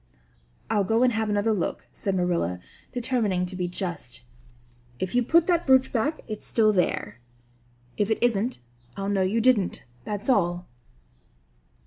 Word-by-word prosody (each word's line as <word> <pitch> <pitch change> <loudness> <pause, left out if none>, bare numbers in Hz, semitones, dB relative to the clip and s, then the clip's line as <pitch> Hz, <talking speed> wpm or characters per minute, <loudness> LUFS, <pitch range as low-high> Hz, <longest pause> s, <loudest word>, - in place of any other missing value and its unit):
"I'll 210 -2 +1
go 225 +5 +2
and 250 -1 +3
have 220 -1 -1
another 205 +2 +1
look," 185 -5 -3
said 195 -1 -3
Marilla, 170 - 0 0.3
determining 230 -7 0
to 185 +1 -6
be 180 -1 -2
just. 175 - -5 0.7
"If 185 +5 -3
you 245 - +3
put 330 +7 +4
that 345 -3 +1
brooch 260 0 +4
back 285 +7 0
it's 215 -2 -5
there 225 - +2 0.6
still. 120 - -9
If 205 - -4
it 220 - +2
isn't 235 - 0 0.4
I'll 195 0 -2
know 200 -1 +1
you 190 +5 +1
didn't, 230 -6 +2 0.2
that's 205 -1 -5
all!" 175 -8 +1
205 Hz, 150 wpm, -26 LUFS, 180-235 Hz, 0.7 s, put